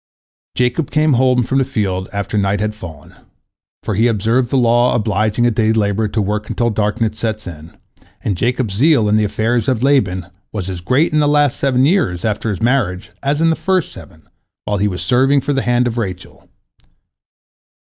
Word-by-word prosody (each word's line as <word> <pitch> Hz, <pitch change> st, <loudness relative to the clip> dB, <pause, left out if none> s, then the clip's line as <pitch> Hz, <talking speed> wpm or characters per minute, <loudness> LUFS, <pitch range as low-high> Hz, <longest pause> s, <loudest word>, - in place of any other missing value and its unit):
Jacob 125 Hz, +4 st, 0 dB
came 155 Hz, -1 st, +2 dB
home 125 Hz, 0 st, +3 dB
from 135 Hz, +3 st, 0 dB
the -, -, +3 dB
field 95 Hz, -7 st, -2 dB
after 100 Hz, +1 st, -4 dB
night 100 Hz, -1 st, +1 dB
had 105 Hz, +1 st, -1 dB
fallen, 85 Hz, -9 st, -11 dB, 0.7 s
for 110 Hz, -, -2 dB
he 110 Hz, +5 st, +2 dB
observed 115 Hz, +3 st, +1 dB
the 135 Hz, -, +1 dB
law 120 Hz, 0 st, +3 dB
obliging 110 Hz, +1 st, 0 dB
a 120 Hz, -, +3 dB
day 110 Hz, 0 st, +1 dB
laborer 105 Hz, 0 st, 0 dB
to 110 Hz, -, -3 dB
work 105 Hz, +2 st, -3 dB
until 120 Hz, -1 st, 0 dB
darkness 110 Hz, +1 st, -1 dB
sets 110 Hz, -2 st, -3 dB
in, 80 Hz, -2 st, -10 dB, 0.5 s
and 100 Hz, -, -1 dB
Jacob's 120 Hz, +1 st, -1 dB
zeal 130 Hz, 0 st, +3 dB
in 105 Hz, -, +2 dB
the 110 Hz, -, +2 dB
affairs 110 Hz, +2 st, -1 dB
of 125 Hz, -3 st, 0 dB
Laban 100 Hz, -11 st, +1 dB, 0.3 s
was 95 Hz, -3 st, -4 dB
as 90 Hz, -2 st, -6 dB
great 135 Hz, -, +1 dB
in 155 Hz, -, +3 dB
the 150 Hz, -, +2 dB
last 145 Hz, -2 st, +2 dB
seven 130 Hz, -1 st, +1 dB
years, 140 Hz, -, +1 dB
after 110 Hz, +1 st, -1 dB
his 105 Hz, +1 st, -3 dB
marriage, 115 Hz, -8 st, 0 dB
as 145 Hz, +2 st, -1 dB
in 165 Hz, 0 st, +4 dB
the -, -, +1 dB
first 185 Hz, -2 st, -1 dB
seven, 80 Hz, -5 st, -14 dB, 0.4 s
while 105 Hz, -, -1 dB
he 105 Hz, -, +2 dB
was 90 Hz, -2 st, -4 dB
serving 135 Hz, +3 st, +3 dB
for 140 Hz, +2 st, -2 dB
the 135 Hz, -, 0 dB
hand 120 Hz, 0 st, +1 dB
of 120 Hz, 0 st, -2 dB
Rachel. 95 Hz, -5 st, -7 dB
115 Hz, 195 wpm, -17 LUFS, 105-130 Hz, 0.7 s, in